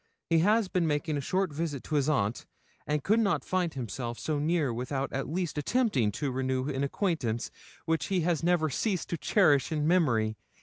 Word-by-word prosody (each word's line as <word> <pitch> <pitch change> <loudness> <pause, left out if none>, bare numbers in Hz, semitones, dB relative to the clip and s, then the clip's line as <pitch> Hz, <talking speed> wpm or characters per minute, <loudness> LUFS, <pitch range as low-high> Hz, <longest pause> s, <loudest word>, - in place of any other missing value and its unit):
He 165 - +5
has 210 +4 +3
been 180 -2 0
making 150 +1 0
a 145 - -1
short 185 +3 -1
visit 150 -3 -3
to - - -7
his 145 -1 +2
aunt, 115 -7 0 0.4
and 150 -1 0
could 215 +3 +3
not 185 - +1
find 180 -5 -1
himself 120 -1 -4
so 155 -2 -2
near 155 -4 +1
without 135 +3 -3
at 135 +1 -2
least 170 -2 -2
attempting 150 - +1
to 140 +3 -2
renew 130 0 -1
an 135 -1 -1
acquaintance 140 - -1 0.3
which 165 0 0
he 190 -2 +1
has 165 -1 +1
never 170 -3 +2
ceased 190 - -1
to 170 - -2
cherish 150 - +3
in 150 -1 0
memory. 115 -11 +2
150 Hz, 190 wpm, -29 LUFS, 135-175 Hz, 0.4 s, He